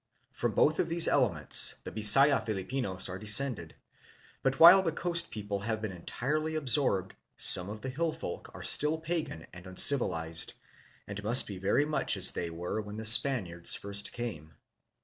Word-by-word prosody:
From 120 -3 -7
both 155 +6 -2
of 170 - -4
these 170 0 +4
elements - - 0
the - - -11
Bisaya 135 +7 +5
Filipinos 100 -1 -4
are 95 0 -10
descended, 105 - +1 0.7
but 135 0 -5
while 175 +4 +5
the 170 -3 -5
coast 170 +1 -5
people 105 -2 -9
have 110 +2 -7
been 110 -2 -9
entirely 150 - -7
absorbed, 130 - -2 0.2
some 90 +2 +7
of 105 +1 -12
the 130 - -9
hill 160 +5 -6
folk 155 - -11
are - - -13
still 150 +2 +4
pagan 160 - -8
and 90 +1 -15
uncivilized, 85 - +1 0.5
and 100 0 -11
must 115 +5 +2
be 100 -3 -12
very 100 +10 -3
much 155 0 -3
as - - +1
they 85 - -8
were 90 +6 -8
when 105 0 -13
the 110 - -9
Spaniards 110 -7 +4
first 100 0 -6
came. 80 -11 -11
110 Hz, 170 wpm, -26 LUFS, 95-145 Hz, 0.7 s, some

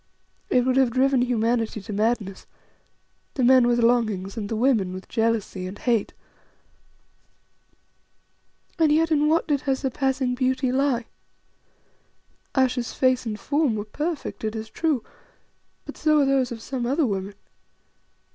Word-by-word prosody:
It 250 -1 +3
would 260 0 +1
have 265 -2 +4
driven 260 +1 +2
humanity 230 -2 0
to 210 +1 -8
madness: 210 -2 -1 0.9
the 260 - 0
men 255 0 +6
with 240 0 +2
longings 215 -5 +1
and 210 -3 -4
the 225 - -2
women 220 -6 +1
with 185 0 -8
jealousy 225 -5 -1
and 190 +2 -8
hate. 235 -4 0 2.7
And 315 -2 +4
yet 325 +2 +2
in 300 -1 +3
what 330 +2 +2
did 290 -3 +1
her 270 -2 0
surpassing 265 -1 -1
beauty 260 0 0
lie? 260 -3 +1 1.5
Ayesha's 255 -3 +1
face 255 -2 +1
and 210 -1 -4
form 285 -1 0
were 205 -1 -4
perfect, 300 +7 -4
it 215 0 -2
is 220 0 -6
true; 310 -8 0 0.8
but - - -9
so 305 -1 +3
are - - +3
those 270 -2 +1
of 225 -1 -7
some 255 -3 -3
other 285 +4 +1
women. 200 -2 -3
245 Hz, 145 wpm, -24 LUFS, 220-270 Hz, 2.7 s, men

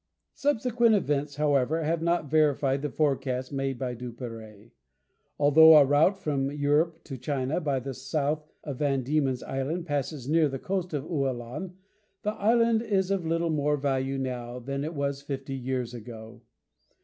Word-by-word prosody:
Subsequent 240 -5 +2
events, 145 -6 -1
however, 150 +1 +1
have 160 +2 0
not 170 -1 +1
verified 140 -2 +2
the 150 - -2
forecast 135 -2 -1
made 135 -1 -2
by 125 -1 -3
Duperrey. 115 -3 -9 0.7
Although 155 +2 +8
a 145 - +7
route 150 +8 +3
from 140 -6 -1
Europe 150 +3 0
to 135 -4 -8
China, 135 +3 -1
by 140 -4 0
the 135 +1 -5
south 145 +3 -2
of 145 -4 -6
Van 135 -3 +1
Diemen's 135 -2 0
Island, 150 +6 -3
passes 145 -3 -3
near 155 0 +3
the 135 - -4
coast 180 +1 -3
of 140 - -2
Ualan, 140 +2 -3 0.5
the 210 - 0
island 230 +1 +2
is 195 -4 0
of 185 -4 -1
little 165 0 0
more 150 -1 +1
value 135 -1 -1
now 125 -2 -4
than 140 +3 -4
it 160 +2 -4
was 140 -1 -2
fifty 135 -1 -5
years 125 -2 -3
ago. 115 0 -10
145 Hz, 160 wpm, -27 LUFS, 130-160 Hz, 0.7 s, Although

